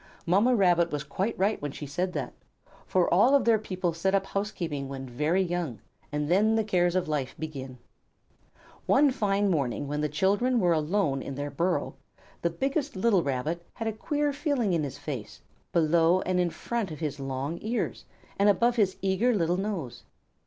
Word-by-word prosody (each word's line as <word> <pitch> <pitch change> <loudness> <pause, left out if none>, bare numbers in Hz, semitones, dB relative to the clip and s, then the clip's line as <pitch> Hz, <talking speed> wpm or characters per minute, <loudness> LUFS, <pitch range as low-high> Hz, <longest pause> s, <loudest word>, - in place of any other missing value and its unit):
Mamma 205 +9 +4
Rabbit 175 -4 +4
was 150 -1 -2
quite 195 +9 -2
right 200 +3 +1
when 145 -1 -3
she 145 - -7
said 180 +6 -2
that, - - -4 0.5
for 185 -2 +2
all 235 +10 +5
of 280 - +3
their 225 -2 +4
people 185 -4 -2
set 190 +4 +1
up 195 -1 +1
housekeeping 170 -9 -3
when 135 -1 -6
very 150 +9 +1
young, 170 - -3 0.3
and 150 0 -1
then 210 +6 +3
the 220 - +2
cares 180 -4 +1
of 185 -1 +1
life 145 -4 -2
begin. 135 -5 -6 1.1
One 280 +1 +5
fine 205 -5 +1
morning 140 -3 -1
when 150 +1 -2
the 150 - 0
children 205 - +2
were 175 -4 +3
alone 155 -3 0
in 135 - -6
their 145 +1 -4
burrow, 170 -4 0 0.5
the 170 - +1
biggest 275 - -2
little 195 -1 +3
Rabbit 145 +4 -2
had 225 - -4
a 220 - -1
queer 290 +6 -1
feeling 280 - 0
in 165 - +1
his 140 -2 -5
face, 130 -8 -6 0.3
below 170 +2 +3
and 185 0 0
in 175 -1 +2
front 230 +3 -3
of 155 - -7
his 145 -3 -3
long 135 +4 -3
ears, 230 +3 -2 0.3
and 200 +1 +5
above 235 +5 +3
his 195 -4 +2
eager 200 +6 +2
little 175 -2 +1
nose. 190 - -4
180 Hz, 185 wpm, -28 LUFS, 150-210 Hz, 1.1 s, all